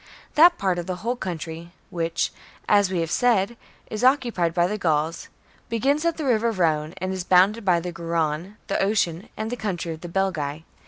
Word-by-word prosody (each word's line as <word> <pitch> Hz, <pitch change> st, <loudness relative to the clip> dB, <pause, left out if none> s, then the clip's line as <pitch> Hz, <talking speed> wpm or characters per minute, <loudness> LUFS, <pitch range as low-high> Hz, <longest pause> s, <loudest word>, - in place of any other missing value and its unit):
That 345 Hz, +3 st, +6 dB
part 185 Hz, -2 st, 0 dB
of 175 Hz, -, -5 dB
the 185 Hz, -, -2 dB
whole 240 Hz, +2 st, +1 dB
country 170 Hz, -4 st, -6 dB, 0.2 s
which, 165 Hz, -1 st, -1 dB, 0.3 s
as 205 Hz, -2 st, +4 dB
we 180 Hz, -3 st, 0 dB
have 165 Hz, 0 st, -3 dB
said, 235 Hz, -3 st, +2 dB, 0.3 s
is 215 Hz, +2 st, -5 dB
occupied 245 Hz, -, +3 dB
by 175 Hz, +1 st, +2 dB
the 210 Hz, +4 st, -2 dB
Gauls, 160 Hz, -2 st, 0 dB, 0.4 s
begins 275 Hz, +7 st, +1 dB
at 335 Hz, -1 st, +1 dB
the 310 Hz, -, -3 dB
river 235 Hz, -2 st, +2 dB
Rhdne, 160 Hz, -5 st, 0 dB
and 185 Hz, 0 st, -3 dB
is 185 Hz, -1 st, -3 dB
bounded 190 Hz, +5 st, +4 dB
by 180 Hz, -3 st, +3 dB
the 180 Hz, +1 st, -4 dB
Garonne, 170 Hz, +3 st, -2 dB
the 195 Hz, -, -1 dB
Ocean, 195 Hz, -4 st, 0 dB
and 220 Hz, +1 st, -3 dB
the -, -, -1 dB
country 180 Hz, -7 st, -3 dB
of 160 Hz, -, -11 dB
the 175 Hz, -, -7 dB
Belgae. 165 Hz, -5 st, -1 dB
185 Hz, 195 wpm, -24 LUFS, 170-220 Hz, 0.4 s, That